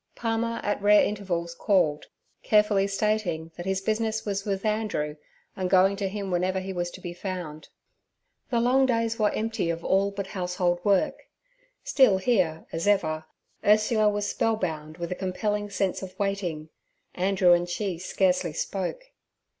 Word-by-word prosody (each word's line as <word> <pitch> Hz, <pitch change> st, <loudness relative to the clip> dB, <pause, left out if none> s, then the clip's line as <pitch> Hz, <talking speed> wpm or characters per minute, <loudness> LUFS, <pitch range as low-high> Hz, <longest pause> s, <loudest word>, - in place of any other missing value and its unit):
Palmer 230 Hz, 0 st, -1 dB
at 205 Hz, 0 st, -1 dB
rare 205 Hz, +1 st, +6 dB
intervals 175 Hz, -5 st, -2 dB
called, 170 Hz, -6 st, +1 dB, 0.3 s
carefully 210 Hz, -2 st, +3 dB
stating 195 Hz, -5 st, -1 dB
that 175 Hz, +1 st, -7 dB
his 190 Hz, 0 st, 0 dB
business 220 Hz, +1 st, -1 dB
was 200 Hz, -1 st, -2 dB
with 195 Hz, 0 st, -2 dB
Andrew, 210 Hz, -9 st, -1 dB, 0.4 s
and 185 Hz, -1 st, -2 dB
going 190 Hz, +1 st, +5 dB
to 195 Hz, -1 st, -1 dB
him 200 Hz, -1 st, -4 dB
wherever 185 Hz, +2 st, 0 dB
he 190 Hz, +1 st, -5 dB
was 175 Hz, -1 st, -2 dB
to -, -, -11 dB
be 175 Hz, -, -6 dB
found. 175 Hz, -4 st, -6 dB, 0.8 s
The 235 Hz, -, +1 dB
long 260 Hz, +3 st, +3 dB
days 230 Hz, -2 st, 0 dB
were 210 Hz, -1 st, +4 dB
empty 220 Hz, -5 st, -2 dB
of 165 Hz, 0 st, -3 dB
all 195 Hz, +1 st, +3 dB
but 200 Hz, -1 st, -5 dB
household 180 Hz, -2 st, -1 dB
work; 200 Hz, -2 st, +1 dB, 0.6 s
still 265 Hz, -, +4 dB
here, 185 Hz, -6 st, +1 dB
as 165 Hz, +4 st, -3 dB
ever, 160 Hz, -6 st, +1 dB, 0.4 s
Ursula 215 Hz, +1 st, +4 dB
was 205 Hz, 0 st, -1 dB
spellbound 160 Hz, -8 st, -2 dB
with 170 Hz, 0 st, -5 dB
a -, -, +2 dB
compelling 205 Hz, +3 st, -2 dB
sense 195 Hz, -2 st, -1 dB
of 185 Hz, -1 st, -9 dB
waiting, 185 Hz, -6 st, -2 dB, 0.4 s
Andrew 185 Hz, -1 st, +3 dB
and 175 Hz, 0 st, +1 dB
she 180 Hz, -1 st, -2 dB
scarcely 180 Hz, -2 st, +1 dB
spoke. -, -, -4 dB
195 Hz, 155 wpm, -26 LUFS, 175-210 Hz, 0.8 s, rare